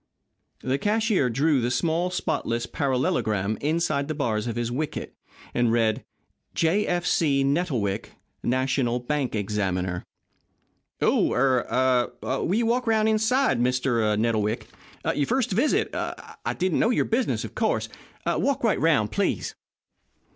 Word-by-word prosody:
The 130 +2 0
cashier 210 - +2
drew 140 +3 +2
the 120 - 0
small, 170 +6 0
spotless 120 -9 -1
parallelogram 110 -7 0
inside 155 -2 0
the 155 - -3
bars 115 -6 -1
of 115 - -3
his 120 0 -2
wicket, 150 +5 -4 0.4
and 120 -2 +2
read: 115 -2 +1 0.5
J. 175 +6 +2
F. 175 0 0
C. 140 -4 +2
Nettlewick 135 - -1 0.3
National 130 -1 +1
Bank 130 0 -2
Examiner 95 -4 -1 1.0
"Oh - - +3
er 130 -1 +2
will 135 +8 -1
you 230 +1 +2
walk 240 +2 +1
around 220 -1 +3
inside, 220 - +2
Mr. 125 -1 +1
er - - -3
Nettlewick. 110 0 0 0.5
Your 145 - 0
first 255 -2 0
visit 240 +10 +1 0.6
didn't 185 -2 +1
know - - +3
your 245 - +2
business, 240 +3 0
of - - -9
course. - - 0 0.4
Walk 280 -3 0
right 225 - +2
around, 145 -10 +3
please." 105 - -1
135 Hz, 135 wpm, -25 LUFS, 120-180 Hz, 1.0 s, Oh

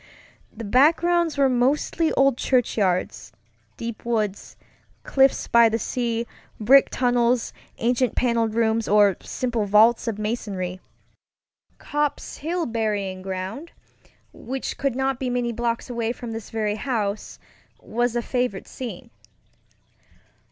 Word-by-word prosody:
The 230 - -9
backgrounds 325 +7 +3
were 275 -1 +4
mostly 275 +6 +1
old 275 -2 +3
churchyards, 215 -8 0 0.5
deep 230 -1 -6
woods, 215 -4 -2 0.5
cliffs 270 0 +2
by 235 -1 +6
the 225 - 0
sea, 235 0 -2 0.3
brick 265 +6 +6
tunnels, 245 -1 +1 0.2
ancient 245 0 +1
paneled 230 -3 +1
rooms, 225 -1 +1
or 205 -2 +5
simple 240 -4 -2
vaults 220 +4 +4
of 225 -3 -2
masonry. 205 -4 -3 1.0
Copp's 295 -1 -3
Hill 335 +3 -2
Burying 205 -5 -2
Ground, 190 - -6 0.6
which 265 +1 -5
could 275 -3 0
not 265 -1 -1
be 260 - -2
many 245 -1 -1
blocks 235 0 -2
away 235 -2 -2
from 240 -2 -8
this 225 -2 -7
very 215 -1 -2
house, 215 -5 -3 0.4
was 240 +1 -1
a 240 - 0
favorite 245 -7 -2
scene. 250 -3 -8
235 Hz, 120 wpm, -23 LUFS, 215-255 Hz, 1.0 s, by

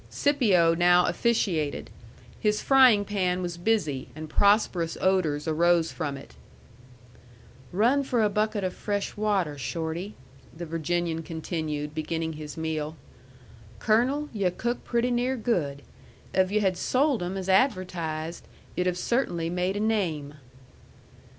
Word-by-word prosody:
Scipio 205 - +3
now 175 +1 +4
officiated. 180 -11 0 0.5
His 210 0 +1
frying 255 -7 +5
pan 185 -3 -1
was 175 -1 -3
busy, 175 -8 0
and 155 0 -7
prosperous 200 -5 +2
odors 165 -6 +1
rose 170 +1 +3
from 140 -2 -4
it. 135 - -13 1.4
"Run 235 +9 +3
for 245 -4 +1
a - - +4
bucket 210 0 0
of 185 -1 -1
fresh 205 -1 -3
water, 195 -9 0
Shorty," 165 +7 -4 0.4
the 170 - -5
Virginian 165 +1 -2
continued, 155 -2 -4
beginning 160 +1 -3
his 150 0 -8
meal. 160 -1 -3 0.8
"Colonel, 255 +7 +1
yu' 200 -4 +1
cook 240 +7 -3
pretty 240 +1 0
near 250 +2 0
good. 160 - -1 0.5
If 185 -1 +3
yu' 215 +1 +2
had 190 -3 +1
sold 270 -3 +1
'em 180 +2 -3
as 190 -1 -5
advertised, 180 - 0 0.3
yu'd 180 - 0
have 180 -1 0
cert'nly 175 -7 -1
made 180 +2 -1
a - - -1
name." 175 -10 -1
180 Hz, 130 wpm, -27 LUFS, 160-215 Hz, 1.4 s, frying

